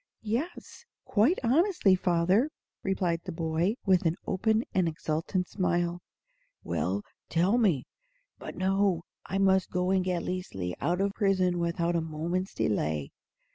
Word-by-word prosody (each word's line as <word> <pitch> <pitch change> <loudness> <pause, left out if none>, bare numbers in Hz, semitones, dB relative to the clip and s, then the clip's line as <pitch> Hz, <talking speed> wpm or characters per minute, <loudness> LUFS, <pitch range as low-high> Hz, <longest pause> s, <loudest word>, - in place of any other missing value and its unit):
"Yes, 250 +11 -4 0.2
quite 240 - +3
honestly, 285 - +3
father," 185 - +2 0.3
replied 180 -3 0
the - - -5
boy, 165 +5 0
with 185 -3 +4
an 165 - +1
open 220 +4 +1
and 185 -2 +2
exultant 165 +3 -2
smile. 175 -2 0 0.6
"Well, 100 +3 -1 0.3
tell 185 +8 +3
me 180 - +2 0.5
But - - -7
no; 190 -2 +1 0.2
I 195 - -2
must 190 -1 +3
go 180 0 0
and 190 -1 +3
get 180 -2 -1
Liesli 95 - -4
out 175 +2 +1
of 200 0 0
prison 185 -4 +2
without 170 0 0
a 170 - +2
moment's 165 +4 -3
delay. 75 -8 -1
180 Hz, 135 wpm, -29 LUFS, 170-195 Hz, 0.6 s, with